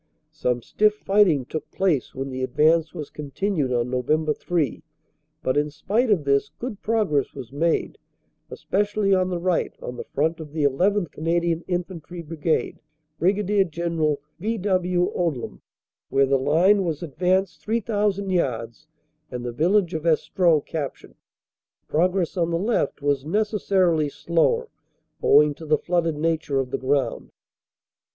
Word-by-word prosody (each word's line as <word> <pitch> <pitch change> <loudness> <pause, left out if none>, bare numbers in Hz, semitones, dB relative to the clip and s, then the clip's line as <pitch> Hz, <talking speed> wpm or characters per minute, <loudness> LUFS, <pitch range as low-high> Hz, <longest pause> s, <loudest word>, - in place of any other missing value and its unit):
"Some 125 -6 -1
stiff 210 - +2
fighting 195 -10 +3
took 155 +4 -6
place 170 -9 0
when 135 +1 -4
the 130 0 -4
advance 155 +5 +2
was 155 -5 -7
con 150 -2 -7
tinued 170 -4 -1
on 120 0 0
Nov. 150 +5 +1
3, 170 -5 -1 0.6
but 130 - 0
in 150 +1 +1
spite 215 - 0
of 190 -8 +3
this 140 0 +2
good 235 -4 -6
progress 210 -11 0
was 130 -4 -8
made, 160 +4 0 0.5
especially 205 0 0
on 185 -1 +2
the 180 - -1
right 175 0 0
on 125 - -7
the - - -5
front 160 +4 -1
of 150 -2 -9
the 155 -2 -1
llth. 180 +7 +2
Canadian 170 +1 0
In 180 -1 0
fantry 175 -1 -9
Brigade 160 0 -1 0.4
(Brig. 195 +1 +2
General 160 -3 -1 0.2
V. 225 +2 -1
W. 180 -2 +1
Odium), 160 -9 -2 0.5
where 135 0 +3
the 135 0 +2
line 175 +9 +4
was 165 -2 -3
advanced 180 +4 0
3,000 205 -3 -1
yards 125 -6 -2 0.4
and 125 -1 -6
the 120 - -2
village 180 - +2
of 160 +1 -3
Estreux 165 -1 +2
cap 145 -5 -3
tured. - - -17 0.7
Progress 180 +2 +1
on 170 -2 +1
the 165 - 0
left 180 -8 -1
was 140 -2 +1
necessarily 185 -4 +1
slower 175 - +1 0.5
owing 150 0 +5
to 160 - -11
the 155 0 +4
flooded 165 -2 0
nature 160 -3 0
of 130 -1 -3
the - - -2
ground. 130 -3 -1
165 Hz, 150 wpm, -24 LUFS, 145-190 Hz, 0.7 s, owing